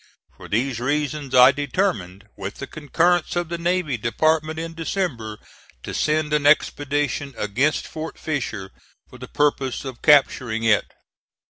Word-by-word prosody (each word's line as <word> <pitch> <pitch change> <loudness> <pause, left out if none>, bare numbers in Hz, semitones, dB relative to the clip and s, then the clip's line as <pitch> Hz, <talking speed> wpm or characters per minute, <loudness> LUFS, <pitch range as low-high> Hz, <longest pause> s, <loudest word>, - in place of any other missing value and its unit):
For - - -12
these 120 +3 -1
reasons 145 +1 -2
I 125 +1 +9
determined, 130 - -2
with 100 +2 -6
the 140 - -6
concurrence 165 +5 0
of 175 -2 -1
the 170 0 -4
Navy 170 -6 0
Department, 155 +8 0
in 165 0 -5
December, 160 - -3 0.5
to - - -6
send 155 0 0
an 150 -1 +2
expedition 145 -2 +1
against 125 +9 0
Fort 160 0 -7
Fisher 120 - -4 0.4
for 125 - -14
the 125 - -8
purpose 140 -3 0
of 130 -3 -7
capturing 130 -6 +3
it. 110 -2 +2
145 Hz, 140 wpm, -22 LUFS, 125-155 Hz, 0.5 s, I